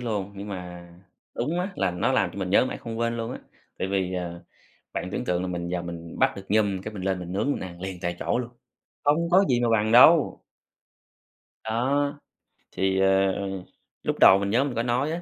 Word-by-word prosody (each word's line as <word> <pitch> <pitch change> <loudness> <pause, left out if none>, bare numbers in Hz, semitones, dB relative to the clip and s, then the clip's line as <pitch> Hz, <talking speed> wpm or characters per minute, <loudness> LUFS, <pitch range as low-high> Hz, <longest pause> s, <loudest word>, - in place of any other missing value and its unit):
luôn. 105 -5 -3
Nhưng 100 +1 -7
mà 90 -2 -7 0.5
đúng 155 +9 -1
á, 190 +2 -3
là 95 -1 +1
nó 90 - 0
làm - - +2
cho - - -8
mình 95 -2 -3
nhớ 100 - +5
mãi - - -4
không 115 -1 -6
quên 115 0 0
luôn 115 +1 -4
á, - - -6 0.4
tại 95 - -2
vì, 95 -1 -1
ờ, 85 -1 -5 0.5
bạn - - -3
tưởng - - -3
tượng 90 0 0
là 90 - -3
mình 85 -1 -4
vào 90 -1 -2
mình 85 -1 -8
bắt - - +3
được 100 - -9
nhum 100 -2 +2
cái 105 +2 -7
mình 95 - -6
lên 95 -1 0
mình 90 -1 -7
nướng 105 +9 0
mình - - -2
ăn 90 -1 -9
liền 95 -1 -5
tại 85 0 -2
chỗ - - 0
luôn, 120 -1 -4 0.5
không 160 +4 +2
có 190 +3 +6
gì 125 -2 +3
mà 120 - +2
bằng 110 -1 +2
đâu. 145 +6 +6 1.3
Đó. 140 +6 0 0.5
Thì, 95 0 0
à, 95 0 +4
ờ, 100 -1 -3 0.5
lúc - - -2
đầu 95 - +8
mình 100 0 -2
nhớ 120 +6 +3
mình 140 -3 -3
có 115 - 0
nói 125 +5 0
á 170 +2 -3
100 Hz, 230 wpm, -25 LUFS, 95-120 Hz, 1.3 s, đầu